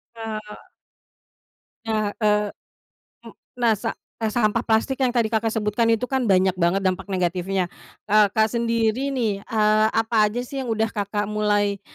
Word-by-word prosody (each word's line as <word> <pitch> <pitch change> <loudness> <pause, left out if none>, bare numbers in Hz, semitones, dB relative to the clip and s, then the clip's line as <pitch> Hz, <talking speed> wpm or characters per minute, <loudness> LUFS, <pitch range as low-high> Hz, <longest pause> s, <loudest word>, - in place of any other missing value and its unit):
Eee 215 -2 -7 1.2
Ca 215 -2 -1
eee, 210 -1 +2 0.8
m - - -10 0.3
nah, 235 -2 +3
sa 205 - -3 0.3
eee, 220 - +1
sampah 215 0 +1
plastik 240 +4 0
yang 260 - +3
tadi 235 -3 +1
Kakak 225 0 +1
sebutkan 220 +1 0
itu, 225 +2 +2
kan, 265 +1 -1
banyak 190 -1 +4
banget 180 +2 +2
dampak 185 +2 -1
negatifnya. 185 0 -1 0.4
Kakak 215 +1 +3
sendiri, 230 +2 0
nih. 225 -7 -1
Eee, 215 0 +2
apa 225 -1 +2
aja, 230 +4 -4
sih, 270 +2 -5
yang 255 - -5
udah 225 0 0
Kakak 205 0 -2
mulai 205 -1 0
215 Hz, 150 wpm, -23 LUFS, 205-230 Hz, 1.2 s, banyak